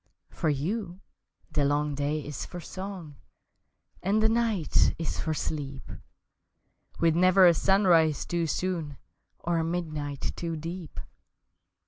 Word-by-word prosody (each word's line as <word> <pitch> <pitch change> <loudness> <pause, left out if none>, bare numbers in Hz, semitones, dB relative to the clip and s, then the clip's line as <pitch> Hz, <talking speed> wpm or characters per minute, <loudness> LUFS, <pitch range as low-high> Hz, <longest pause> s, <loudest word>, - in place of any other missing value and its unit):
For 160 - -1
you 175 +6 -2 0.5
the 145 - +1
long 145 +1 +1
day 145 +1 -1
is 145 -2 -5
for 175 - -7
song 185 -4 -7 0.8
And 200 +3 +2
the 220 0 +4
night 225 -8 +2
is 165 - -3
for 155 -1 -1
sleep 140 -3 -4 1.1
With 165 -1 +3
never 185 +2 +6
a 175 - +8
sunrise 170 -4 +3
too 170 -1 -1
soon 160 -3 -2 0.4
Or 170 -1 -1
a - - +1
midnight 155 -4 -3
too 165 -1 -3
deep! 165 +1 -6
165 Hz, 125 wpm, -28 LUFS, 150-185 Hz, 1.1 s, a